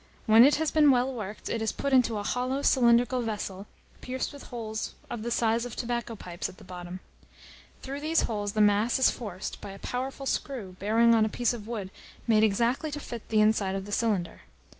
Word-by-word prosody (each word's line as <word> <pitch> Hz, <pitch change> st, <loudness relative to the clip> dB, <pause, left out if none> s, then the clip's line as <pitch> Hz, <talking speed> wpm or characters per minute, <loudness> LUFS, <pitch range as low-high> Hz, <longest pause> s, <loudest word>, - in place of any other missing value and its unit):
When 225 Hz, +1 st, +8 dB
it 285 Hz, +3 st, +6 dB
has 315 Hz, 0 st, 0 dB
been 300 Hz, -2 st, +5 dB
well 260 Hz, 0 st, +3 dB
worked, 210 Hz, -3 st, -6 dB
it 230 Hz, -, -2 dB
is 220 Hz, -, 0 dB
put 280 Hz, -, -3 dB
into 240 Hz, -4 st, +4 dB
a 205 Hz, -, -3 dB
hollow 255 Hz, +5 st, -1 dB
cylindrical 245 Hz, 0 st, +4 dB
vessel, 205 Hz, -3 st, -4 dB, 0.3 s
pierced 260 Hz, +3 st, -4 dB
with 285 Hz, -, -11 dB
holes 220 Hz, -3 st, -5 dB, 0.2 s
of 235 Hz, -, -4 dB
the 235 Hz, -, -3 dB
size 230 Hz, -1 st, +1 dB
of 245 Hz, -2 st, -6 dB
tobacco 235 Hz, -1 st, -3 dB
pipes 175 Hz, -4 st, -5 dB
at 185 Hz, -, -14 dB
the -, -, -14 dB
bottom. 180 Hz, 0 st, -8 dB, 0.8 s
Through 275 Hz, +1 st, -5 dB
these 315 Hz, +2 st, +1 dB
holes 205 Hz, -3 st, -2 dB
the 215 Hz, -, +2 dB
mass 210 Hz, +3 st, +3 dB
is 260 Hz, -, +4 dB
forced 200 Hz, -5 st, -6 dB
by -, -, -7 dB
a -, -, -10 dB
powerful 265 Hz, +5 st, -4 dB
screw 235 Hz, -9 st, -3 dB
bearing 230 Hz, +4 st, +4 dB
on 225 Hz, -1 st, +4 dB
a 215 Hz, -, +1 dB
piece 240 Hz, +2 st, 0 dB
of 220 Hz, -3 st, -8 dB
wood 210 Hz, -5 st, -5 dB, 0.3 s
made 220 Hz, -2 st, +4 dB
exactly 235 Hz, +8 st, +1 dB
to 295 Hz, 0 st, -5 dB
fit 235 Hz, -5 st, -8 dB
the 215 Hz, -1 st, +3 dB
inside 210 Hz, -3 st, +2 dB
of 195 Hz, 0 st, -4 dB
the 205 Hz, -, -9 dB
cylinder. 205 Hz, -6 st, -1 dB
230 Hz, 210 wpm, -28 LUFS, 210-250 Hz, 0.8 s, When